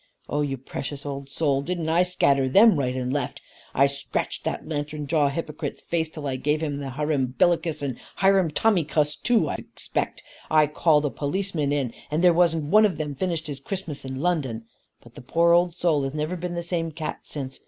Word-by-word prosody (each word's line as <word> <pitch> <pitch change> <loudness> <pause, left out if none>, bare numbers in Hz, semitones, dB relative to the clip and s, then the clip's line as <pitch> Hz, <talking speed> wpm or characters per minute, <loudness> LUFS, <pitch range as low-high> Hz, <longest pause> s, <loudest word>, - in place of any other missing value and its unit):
Oh 145 - -1
you 140 -2 -1
precious 140 +2 -6
old 140 -1 -5
soul, 140 -2 +1
didn't 170 +1 -3
I 165 +2 +3
scatter 140 -7 +2
them 210 - +7
right 130 -2 -1
and 130 0 -2
left? 145 -3 -2 0.4
I 135 - +6
scratched 140 0 -3
that - - -3
lantern 150 -1 -3
jawed 145 -1 +2
hypocrite's 155 -1 -4
face 165 -2 -1
till 155 -2 -8
I 135 -2 -1
gave 150 +4 0
him 145 -2 -2
the 140 -1 -4
hirumbillycuss 150 +3 +1
and 130 -4 -3 0.2
hirumtommycuss 170 -5 +2
too, 235 -1 +3
I - - -2
expect. - - -4 0.3
I 155 -1 +5
called 150 0 +2
a 145 - 0
policeman 155 -1 -1
in, 135 -5 -1 0.2
and 155 +4 0
there 175 -1 +7
wasn't 165 -2 +3
one 215 0 +7
of 190 - -5
them 150 -2 -3
finished 165 +2 -2
his 145 -2 -5
Christmas 170 -1 -5
in 130 0 -5
London. 140 -9 -1 0.4
But 120 - -16
the - - -10
poor 170 +6 +3
old 175 0 +3
soul 170 -5 +2
has 135 +1 -3
never 155 +4 -2
been 175 0 -4
the 170 - -2
same 170 -1 -2
cat 155 0 -5
since. 135 -3 -6
150 Hz, 195 wpm, -25 LUFS, 140-170 Hz, 0.4 s, them